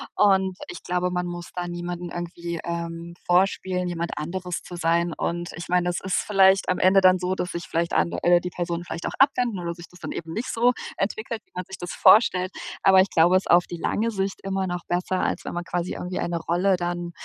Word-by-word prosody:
Und 190 -2 +3
ich 355 - -8
glaube, 180 0 -1
man 180 0 -1
muss 175 0 -7
da 175 -1 -3
niemanden 175 0 -5
irgendwie, 170 -1 -5
ähm, 170 0 -5
vorspielen, 180 0 +1
jemand 170 0 -4
anderes 175 +3 -4
zu 175 - -9
sein. 170 +1 +1
Und, 175 0 -3
ich 170 - -7
meine, 180 0 +2
das 175 - -2
ist 190 - -1
vielleicht 195 -1 +4
am 185 - +1
Ende 190 +1 +5
dann 185 -1 +5
so, 185 +1 -1
dass 180 - -3
sich 170 0 -5
vielleicht 170 0 -1
an 85 +1 +2
äh, - - -2
oder 175 0 +5
die 180 - -5
Personen 175 -1 -3
vielleicht 165 0 -6
auch - - -3
abwenden, 250 -7 +3
oder 170 -1 -3
sich 170 -1 -12
das 180 - -17
dann - - -6
eben 165 -1 -6
nicht 245 +4 -3
so 240 +2 +4 0.3
entwickelt, 220 +3 -3
wie - - -40
man 180 -1 -4
sich 190 - -9
das 175 - -6
vorstellt. 185 -4 +5 0.3
Aber 190 -1 +7
ich 195 - +1
glaube, 170 +3 +4
es 185 - +4
ist - - -2
auf 175 +1 +6
die 175 - -6
lange 225 +6 0
Sicht 195 -1 -2
immer 195 0 -1
noch 175 0 -4
besser, 180 +1 -1
als - - -1
wenn - - -5
man 175 0 -4
quasi 175 0 -2
irgendwie 180 +1 -4
eine 170 -1 -2
Rolle 180 +3 +1
dann 175 0 -3
180 Hz, 235 wpm, -24 LUFS, 170-190 Hz, 0.3 s, Aber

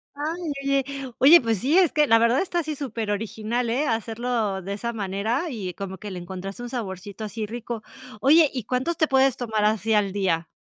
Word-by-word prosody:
Ay, 315 +3 -3
oye 275 0 +2 0.4
oye, 310 +6 +8
pues 225 -4 0
sí, 280 - +2
es 365 -5 +5
que 300 -1 +3
la 225 - +6
verdad 235 +3 +3
está 355 -2 -1
así 310 -2 -3
superoriginal, 225 -2 -3
eh, 260 +6 +1
hacerlo 225 -3 -1
de 195 +2 -5
esa 235 +4 -3
manera 215 - -2
y 200 - -5
como 190 -1 -6
que 205 +2 -8
le 185 - -5
encontraste 190 +5 -7
un 245 - -6
saborcito 205 -3 -6
así 215 +1 -4
rico, 235 0 -6 0.4
oye, 295 +6 +6
¿y 250 -4 -3
cuántos 260 +9 -1
te 315 -2 +3
puedes 265 -1 +3
tomar 220 -3 -1
así 220 +1 +1
al 205 -2 +2
día? 180 -5 0
230 Hz, 200 wpm, -24 LUFS, 205-270 Hz, 0.4 s, oye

